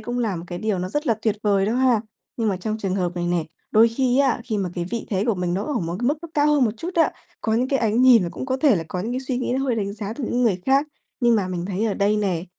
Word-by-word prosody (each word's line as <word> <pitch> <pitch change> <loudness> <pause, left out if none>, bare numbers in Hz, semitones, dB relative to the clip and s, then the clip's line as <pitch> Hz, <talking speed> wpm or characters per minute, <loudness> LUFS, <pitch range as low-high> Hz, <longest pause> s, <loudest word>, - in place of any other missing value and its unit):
cũng 245 0 -4
là 220 -6 0
một 165 - -7
cái 175 0 -6
điều 210 -1 -1
nó 180 - -3
rất 295 +9 -2
là 230 - +3
tuyệt 220 -2 +1
vời 200 -2 +2
đó 220 - 0
ha. 250 -3 +3 0.4
Nhưng 225 -2 0
mà 195 - 0
trong 215 +4 -3
trường 195 -3 -2
hợp 180 -3 -1
này 175 0 -1
nè, 175 -2 0 0.3
đôi 225 +2 +6
khi 250 +2 +1
á, 275 -3 +2
khi 220 -4 -2
mà 185 -3 -2
cái 175 - -2
vị 235 - -3
thế 195 -1 0
của 230 - +2
mình 180 -1 -2
nó 195 +3 -2
ở 295 - -3
một 170 0 -3
cái 245 - 0
mức 295 +2 0
nó 335 - -7
cao 290 0 +3
hơn 295 -3 +4
một 220 - +2
chút 335 +10 -5
á, 330 - +4 0.3
có 220 - 0
những 250 +3 +1
cái 270 -1 +1
ánh 225 +2 +2
nhìn 250 -5 +7
và 175 - -2
cũng - - -6
có 260 -1 0
thể 270 -6 +4
là 165 - -3
có 180 - -3
những 225 +6 -3
cái 255 - -2
suy 260 -1 -3
nghĩ 250 - -1
nó 270 - -1
hơi 255 -3 +1
đánh 200 -3 -2
giá 210 0 -5
từ 260 +3 -5
những 245 +2 0
người 195 -6 +2
khác. 275 +2 +3 0.3
Nhưng 240 -1 +4
mà 195 -3 -1
mình 175 -2 -3
thấy 200 +2 -2
ở 215 -3 0
đây 205 +1 +2
nè, 185 -5 -1
220 Hz, 335 wpm, -23 LUFS, 190-255 Hz, 0.4 s, nhìn